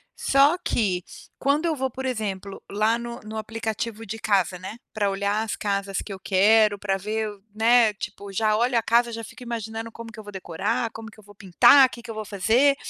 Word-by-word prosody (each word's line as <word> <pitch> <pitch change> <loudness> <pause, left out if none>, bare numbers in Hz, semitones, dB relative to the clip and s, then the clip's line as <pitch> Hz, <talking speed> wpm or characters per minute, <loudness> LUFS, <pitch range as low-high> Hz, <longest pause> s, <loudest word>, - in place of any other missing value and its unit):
Só 275 +4 +4
que 190 - 0 0.4
quando 285 +4 +1
eu 325 -2 +1
vou, 265 -1 -1
por 265 +2 -6
exemplo, 200 -6 -4
lá 215 +3 +2
no 235 0 -6
no 215 +1 -7
aplicativo 225 0 -4
de 225 +2 -6
casa, 190 -4 +1
né, 190 +5 -8 0.2
pra 205 -2 +1
olhar 200 +2 0
as 220 - -3
casas 200 -1 -2
que 200 - -7
eu 190 - -9
quero, 205 +3 +4
pra 195 -1 -1
ver, 215 +3 -2 0.3
né, 230 0 +5
tipo, 200 -1 -7
já 215 +2 +1
olho 240 +2 +2
a 230 - +1
casa, 235 +1 +3
já 230 0 -6
fico 225 - -12
imaginando 225 -1 -5
como 230 0 -9
que 220 - -12
eu - - -8
vou 205 - -10
decorar, 205 +6 -2
como 225 0 -9
que 215 - -18
eu - - -16
vou 205 +1 -16
pintar, 200 +8 +6
que 240 - -10
que 230 - -7
eu - - -8
vou 215 0 -5
fazer 225 +8 +3
220 Hz, 220 wpm, -24 LUFS, 200-235 Hz, 0.4 s, pintar